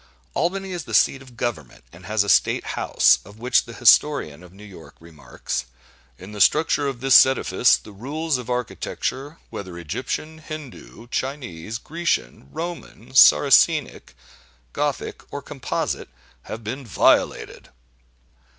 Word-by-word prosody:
Albany 190 +4 -2
is 175 -4 -5
the - - -3
seat 135 - +3
of 125 -3 -16
government, 80 - -5
and 85 +1 -13
has 110 -1 +1
a - - -8
State - - +3
House, - - +3
of 100 +2 -15
which 125 +3 +1
the 115 - -10
historian 120 - +3
of 90 -1 -15
New 100 +3 -15
York 95 -6 -13
remarks: 75 -6 -6 0.5
"In 95 +3 -11
the 105 -1 -5
structure 150 - +3
of 130 -3 -5
this 135 -1 +8
edifice, 125 -4 +2
the 105 - -14
rules 140 +7 -3
of 125 - -9
architecture, 130 +4 -4
whether 95 -3 -7
Egyptian, 130 - -5
Hindoo, 155 -7 -10
Chinese, 120 - -4
Grecian, 165 - -3
Roman, 165 -8 -8
Saracenic, 75 - +4 0.6
Gothic, - - -3
or - - -4
Composite, - - -4 0.4
have 110 - -7
been 125 +6 -5
violated." 115 - +1
120 Hz, 135 wpm, -22 LUFS, 95-145 Hz, 0.6 s, this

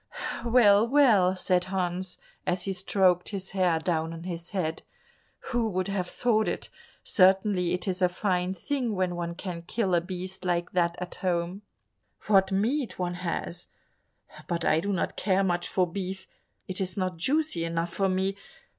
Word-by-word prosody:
"Well, 225 -3 +5
well," 225 -9 +5
said 180 -1 +1
Hans, 185 -1 -2 0.3
as 180 0 0
he 195 - -2
stroked 185 -1 +2
his 195 -2 -5
hair 185 -4 +2
down 160 0 -1
on 165 0 -8
his 170 -1 -6
head, 170 -5 -2 0.7
"who 240 -2 +1
would 185 -1 -1
have 185 -3 -2
thought 220 -3 +1
it? - - -3 0.3
Certainly 190 -2 +3
it 180 +2 -2
is 185 0 -2
a 180 - +4
fine 180 0 -1
thing 245 +3 -2
when 185 -2 0
one 170 0 -3
can 175 -2 -5
kill 190 +2 -1
a 170 - +4
beast 185 +1 -6
like 175 -1 0
that 170 -1 +1
at 180 0 -6
home; 180 +1 -1 0.6
what 195 -2 +4
meat 235 +7 0
one 180 -1 -1
has! 175 0 -3 0.8
But 170 -1 -2
I 155 - +4
do 200 +5 -2
not 185 - -1
care 195 -1 +2
much 175 -2 0
for 185 - +2
beef, 190 +1 -5 0.4
it 185 +1 -2
is 185 0 -3
not 185 -3 -1
juicy 270 - +1
enough 165 +1 -2
for 195 -2 +1
me. 190 +1 0
185 Hz, 170 wpm, -28 LUFS, 175-195 Hz, 0.8 s, Well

